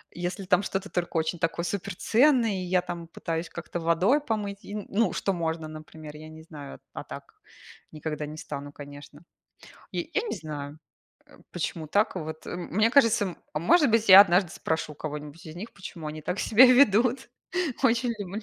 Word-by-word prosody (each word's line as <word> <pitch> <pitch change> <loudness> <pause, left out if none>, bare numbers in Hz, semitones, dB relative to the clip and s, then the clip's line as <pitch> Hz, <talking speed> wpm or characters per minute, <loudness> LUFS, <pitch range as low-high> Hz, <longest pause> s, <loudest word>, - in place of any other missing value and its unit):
Если, 180 +3 -4
там, 180 +1 +3
что-то 195 0 -3
только 175 -1 -2
очень 160 +2 -1
такое, 165 +1 -1
супер 200 +1 -4
ценное, 245 +2 +3
и 185 -2 -3
я, 180 0 +2
там, 175 -1 -7
пытаюсь 165 0 -4
как-то 170 0 -6
водой 180 - +2
помыть 205 -6 -3
и, 205 - -7
ну, 210 +2 0
что 195 - -1
можно, 160 -2 -3
например, 155 -1 -10
я 155 +1 -10
не 160 0 -12
знаю. 145 -4 -10
А - - -6
так - - -10 0.6
никогда 155 -1 -4
не 150 +1 -8
стану, 145 -2 -7
конечно. 145 +1 -12 0.7
Я - - -1
я 435 - +1
не - - -3
знаю, 150 -3 -7 0.5
э, - - -19
почему 165 -2 -4
так, 205 +4 +1
вот 160 -2 -6
мне 195 +5 0
кажется 230 -6 +4
м 185 -3 -6 0.2
может 230 - +4
быть 225 -1 +2
я 190 0 +12
однажды 185 -3 +4
спрошу 160 -2 -3
у - - -13
кого-нибудь 150 +1 -7
из 155 +1 -9
них, 215 +6 -8
почему 175 -5 -9
они 155 0 -6
так 180 +5 -3
себя 240 +4 +7
ведут. 250 -1 +4 0.5
Очень 240 0 +3
лю 200 -3 -5
175 Hz, 180 wpm, -27 LUFS, 155-205 Hz, 0.7 s, я